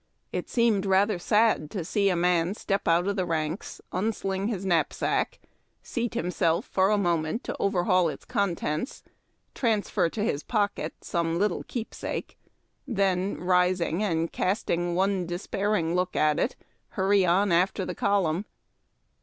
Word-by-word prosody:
It -, -, -4 dB
seemed 225 Hz, -5 st, +2 dB
rather 195 Hz, 0 st, +3 dB
sad 210 Hz, -5 st, +2 dB
to 180 Hz, -4 st, -4 dB
see 200 Hz, +3 st, +2 dB
a 180 Hz, -, +1 dB
man 175 Hz, +1 st, +2 dB
step 195 Hz, -2 st, -2 dB
out 170 Hz, +2 st, +3 dB
of 200 Hz, -, 0 dB
the 190 Hz, -, 0 dB
ranks, 165 Hz, +1 st, -3 dB
un 200 Hz, +5 st, 0 dB
sling 195 Hz, 0 st, -2 dB
his 200 Hz, -4 st, -3 dB
knapsack, 180 Hz, -, 0 dB, 0.5 s
seat 235 Hz, -1 st, -3 dB
himself 170 Hz, -6 st, 0 dB
for 190 Hz, 0 st, +2 dB
a 210 Hz, -, +3 dB
moment 170 Hz, +1 st, 0 dB
to -, -, -4 dB
overhaul 185 Hz, -3 st, +2 dB
its -, -, -8 dB
contents, 195 Hz, -, -2 dB, 0.5 s
transfer 215 Hz, -7 st, +1 dB
to 205 Hz, +4 st, -3 dB
his 145 Hz, -9 st, 0 dB
pocket 205 Hz, -1 st, -1 dB
some 170 Hz, -1 st, -1 dB
little 205 Hz, +3 st, +1 dB
keepsake, 235 Hz, -3 st, -5 dB, 0.5 s
then, 195 Hz, -5 st, 0 dB
rising, 180 Hz, -1 st, +1 dB
and 165 Hz, -5 st, 0 dB
casting 175 Hz, -3 st, 0 dB
one 190 Hz, -1 st, +1 dB
despairing 175 Hz, 0 st, -1 dB
look 180 Hz, 0 st, 0 dB
at 150 Hz, -1 st, +2 dB
it, 255 Hz, -, 0 dB, 0.4 s
hurry 195 Hz, 0 st, +4 dB
on 185 Hz, +3 st, +3 dB
after 180 Hz, +2 st, +2 dB
the -, -, -4 dB
column. 195 Hz, -2 st, +1 dB
190 Hz, 145 wpm, -27 LUFS, 170-205 Hz, 0.5 s, hurry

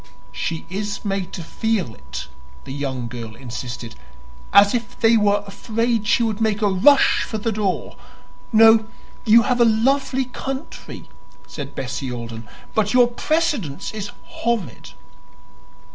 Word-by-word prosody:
"She 165 Hz, +8 st, -4 dB
is 200 Hz, +4 st, -4 dB
made 195 Hz, -2 st, -2 dB
to 175 Hz, -, -5 dB
feel 210 Hz, -, -1 dB
it," 70 Hz, -4 st, -8 dB, 0.4 s
the -, -, -7 dB
young 135 Hz, -4 st, -3 dB
girl 115 Hz, -2 st, -7 dB
insisted 120 Hz, -1 st, -7 dB, 0.6 s
"as 200 Hz, 0 st, +7 dB
if 245 Hz, 0 st, -3 dB
they 230 Hz, 0 st, +5 dB
were 205 Hz, -2 st, +3 dB
afraid 225 Hz, +2 st, -1 dB
she 235 Hz, -, +3 dB
would 220 Hz, -1 st, -1 dB
make 220 Hz, -1 st, +1 dB
a 205 Hz, -, +4 dB
rush 270 Hz, +10 st, +5 dB
for 220 Hz, -, -3 dB
the 225 Hz, +2 st, -1 dB
door. 200 Hz, -3 st, -2 dB, 0.5 s
No; 225 Hz, -1 st, +6 dB, 0.4 s
you 230 Hz, +1 st, +7 dB
have 245 Hz, 0 st, +1 dB
a -, -, +7 dB
lovely 260 Hz, +4 st, +2 dB
country," 270 Hz, +3 st, -7 dB, 0.4 s
said 140 Hz, -2 st, -8 dB
Bessie 130 Hz, 0 st, -4 dB
Alden, 115 Hz, -1 st, -7 dB, 0.3 s
"but 215 Hz, +1 st, +1 dB
your 245 Hz, -1 st, +6 dB
precedence 280 Hz, -, -1 dB
is 205 Hz, -2 st, -5 dB
horrid." 235 Hz, -6 st, -3 dB
210 Hz, 140 wpm, -21 LUFS, 140-230 Hz, 0.6 s, as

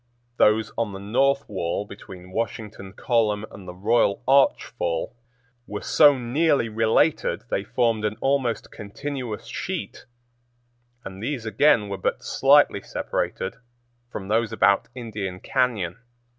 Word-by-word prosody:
Those 105 Hz, +1 st, +3 dB
on 110 Hz, -4 st, -1 dB
the 95 Hz, -, -7 dB
north 135 Hz, +7 st, +1 dB
wall 95 Hz, 0 st, -2 dB
between 95 Hz, -3 st, -12 dB
Washington 105 Hz, -2 st, -4 dB
Column 110 Hz, -3 st, 0 dB
and 95 Hz, -2 st, -12 dB
the 90 Hz, -, -8 dB
Royal 105 Hz, +2 st, +1 dB
Arch 135 Hz, +1 st, +4 dB
Fall 85 Hz, +7 st, -3 dB, 0.5 s
were 105 Hz, -, -6 dB
so 145 Hz, -2 st, +6 dB
nearly 135 Hz, +1 st, +1 dB
related 110 Hz, 0 st, +1 dB
they 95 Hz, -, 0 dB
formed 115 Hz, -1 st, 0 dB
an 105 Hz, 0 st, -1 dB
almost 135 Hz, -4 st, 0 dB
continuous 125 Hz, +2 st, -6 dB
sheet, -, -, -5 dB, 1.0 s
and 95 Hz, 0 st, -8 dB
these 120 Hz, -1 st, -3 dB
again 110 Hz, 0 st, +3 dB
were 100 Hz, -1 st, -4 dB
but 95 Hz, -, -2 dB
slightly -, -, +4 dB
separated 95 Hz, -, -3 dB, 0.5 s
from 95 Hz, -5 st, -7 dB
those 110 Hz, +1 st, +1 dB
about 100 Hz, 0 st, +3 dB
Indian 105 Hz, -7 st, -5 dB
Cañon. 115 Hz, -10 st, -1 dB
110 Hz, 130 wpm, -24 LUFS, 100-120 Hz, 1.0 s, so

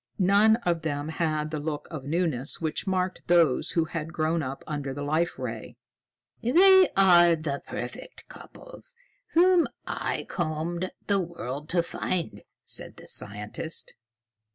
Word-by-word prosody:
None 200 Hz, +3 st, +5 dB
of 170 Hz, -2 st, +1 dB
them 145 Hz, -1 st, -3 dB
had 155 Hz, -2 st, -1 dB
the 155 Hz, -, -2 dB
look 150 Hz, 0 st, -4 dB
of 150 Hz, -5 st, -6 dB
newness 150 Hz, -4 st, 0 dB
which 160 Hz, +4 st, -3 dB
marked 185 Hz, -1 st, -1 dB
those 170 Hz, -7 st, +3 dB
who 165 Hz, -2 st, +2 dB
had 165 Hz, -1 st, -5 dB
grown 160 Hz, 0 st, 0 dB
up 135 Hz, -1 st, -5 dB
under 140 Hz, -3 st, -4 dB
the 145 Hz, -, -4 dB
Life 155 Hz, +4 st, 0 dB
Ray. -, -, -6 dB, 0.6 s
"They 375 Hz, +9 st, +6 dB
are 175 Hz, -3 st, +6 dB
the 150 Hz, -3 st, -4 dB
perfect -, -, -7 dB
couples -, -, -12 dB, 0.4 s
whom 355 Hz, 0 st, +5 dB, 0.2 s
I -, -, -3 dB
combed 170 Hz, +1 st, -2 dB, 0.2 s
the 200 Hz, -1 st, +2 dB
world 150 Hz, -5 st, -5 dB
to 170 Hz, -1 st, +2 dB
find," 170 Hz, 0 st, -3 dB, 0.2 s
said -, -, -4 dB
the -, -, -13 dB
scientist. 105 Hz, +10 st, -3 dB
165 Hz, 140 wpm, -27 LUFS, 150-185 Hz, 0.6 s, They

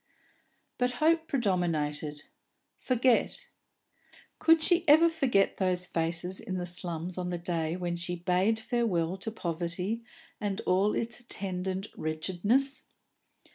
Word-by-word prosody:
But 250 Hz, 0 st, +1 dB
hope 320 Hz, +4 st, +2 dB
predominated. 160 Hz, -, -1 dB, 0.6 s
Forget! 250 Hz, -1 st, +1 dB, 0.9 s
Could 325 Hz, -1 st, +5 dB
she 350 Hz, 0 st, +4 dB
ever 315 Hz, +3 st, +7 dB
forget 265 Hz, -11 st, +1 dB
those 180 Hz, -2 st, 0 dB
faces 175 Hz, +2 st, -1 dB
in 185 Hz, -, -4 dB
the 180 Hz, -, -3 dB
slums 175 Hz, 0 st, -2 dB
on 180 Hz, 0 st, -2 dB
the 175 Hz, -, -2 dB
day 170 Hz, -2 st, -2 dB
when 175 Hz, -1 st, -2 dB
she 175 Hz, +1 st, -3 dB
bade 180 Hz, +5 st, +1 dB
farewell 210 Hz, -8 st, 0 dB
to 195 Hz, -, -5 dB
poverty 180 Hz, +3 st, -2 dB, 0.4 s
and 205 Hz, -1 st, -2 dB
all 195 Hz, +3 st, +2 dB
its 230 Hz, 0 st, -3 dB
attendant 190 Hz, -4 st, -3 dB
wretchedness? 190 Hz, -, 0 dB
185 Hz, 120 wpm, -29 LUFS, 175-235 Hz, 0.9 s, ever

